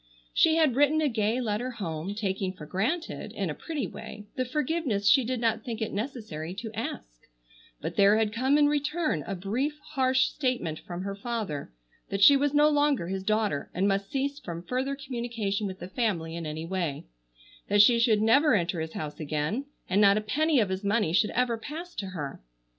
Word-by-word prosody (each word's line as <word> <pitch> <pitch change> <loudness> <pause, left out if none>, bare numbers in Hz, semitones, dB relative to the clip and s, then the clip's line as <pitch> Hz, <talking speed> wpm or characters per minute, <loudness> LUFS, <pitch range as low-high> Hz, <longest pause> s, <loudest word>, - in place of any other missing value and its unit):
She 320 -1 +4
had 310 -7 +3
written 290 +3 +4
a 310 - +2
gay 225 -1 0
letter 235 +1 -1
home, 190 -5 -4
taking 195 -3 -2
for 165 -5 -10
granted, 245 - -2
in - - -2
a - - -3
pretty 305 -8 -4
way, 215 +1 -9
the 255 - 0
forgiveness 270 -6 -1
she 265 +5 +6
did 250 +1 -2
not 225 -1 0
think 230 -2 -5
it 220 - -3
necessary 200 - -5
to 220 +2 -6
ask, - - -6 0.5
but - - -5
there 200 +1 +6
had 220 -1 +1
come 260 +5 +2
in 295 - +5
return 295 - 0
a 195 - -2
brief 240 +11 -2
harsh 265 -2 +3
statement 250 - -2
from 175 0 -6
her 200 0 -3
father 200 - -4 0.4
that 195 0 +1
she 280 - +9
was 285 +1 +2
no 295 +1 +5
longer 290 - +2
his 190 0 -2
daughter 210 -7 0
and 190 +3 +2
must 195 0 0
cease 280 0 -2
from 170 - -7
further 260 +7 -2
communication 235 -7 -3
with 190 -1 -6
the 175 - -7
family 185 -7 -1
in 170 -2 -4
any 155 +1 -4
way; 170 -5 -3 0.6
that 205 0 +6
she 235 +2 +5
should 220 -2 +3
never 275 +5 +5
enter 170 -3 0
his 160 0 -5
house 150 -1 -5
again 155 - -2 0.2
and 195 +3 +2
not 200 0 +6
a - - +1
penny 295 +7 +2
of 210 -4 +2
his 190 +1 -3
money 200 -5 +1
should 210 +4 +3
ever 240 -2 0
pass 325 +8 -7
to 195 - -4
her. 150 -7 -6
220 Hz, 200 wpm, -28 LUFS, 190-265 Hz, 0.6 s, she